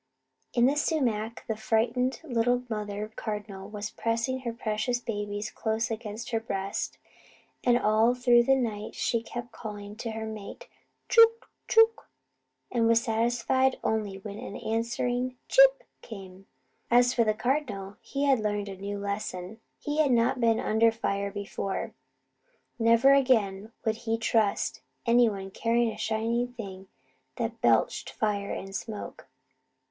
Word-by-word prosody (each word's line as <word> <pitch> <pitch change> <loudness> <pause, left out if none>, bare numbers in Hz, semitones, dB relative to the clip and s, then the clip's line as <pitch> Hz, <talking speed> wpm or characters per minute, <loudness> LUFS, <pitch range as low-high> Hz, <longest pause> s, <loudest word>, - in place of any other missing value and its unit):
In 240 0 +5
the 275 +3 +3
sumac 235 -8 -1
the 220 - -1
frightened 235 +4 0
little 245 -3 +1
mother 210 0 -3
cardinal 205 -2 -5
was 210 0 -5
pressing 230 +3 -1
her 245 -2 -3
precious 230 +1 -1
babies 205 -2 -4
close 220 +1 -1
against 225 +1 -5
her 225 - +1
breast; 195 -3 -3 0.7
and 240 -1 +4
all 220 +2 +3
through 245 -1 +5
the 270 - +5
night 220 -5 -3
she 230 - 0
kept 240 +1 -7
calling 205 -2 -8
to 230 - -4
her 220 0 -4
mate, 215 -2 -8 0.4
"Chook! 460 0 +5 0.2
Chook!" 450 0 +4 0.6
and 230 -2 +2
was 230 0 +4
satisfied 240 +3 +1
only 210 -3 -1
when 200 +1 -8
an - - -7
answering 245 +3 -1
"Chip!" - - +6 0.2
came. 195 -3 -11 0.4
As 245 +1 +5
for 235 - +3
the 215 -1 +1
Cardinal, 220 -5 -2
he 280 0 -3
had 275 -3 +4
learned 205 -1 -2
a 195 - -6
new 200 +1 -4
lesson. 200 0 -4 0.2
He 295 +1 -3
had 305 -3 +4
not 240 +2 +3
been 230 -1 +3
under 225 +1 +3
fire 200 -3 -2
before. 200 -1 -4 0.9
Never 230 +4 +6
again 220 -6 +2
would 220 0 +1
he 225 -1 -1
trust 220 -2 +1 0.2
any 235 0 +5
one 195 -2 -6
carrying 230 +2 +1
a - - -9
shining 230 +2 0
thing 195 -5 -8 0.5
that - - -3
belched - - +2
fire 205 -2 -1
and 195 0 -5
smoke. 215 0 -6
225 Hz, 145 wpm, -28 LUFS, 210-245 Hz, 0.9 s, Chip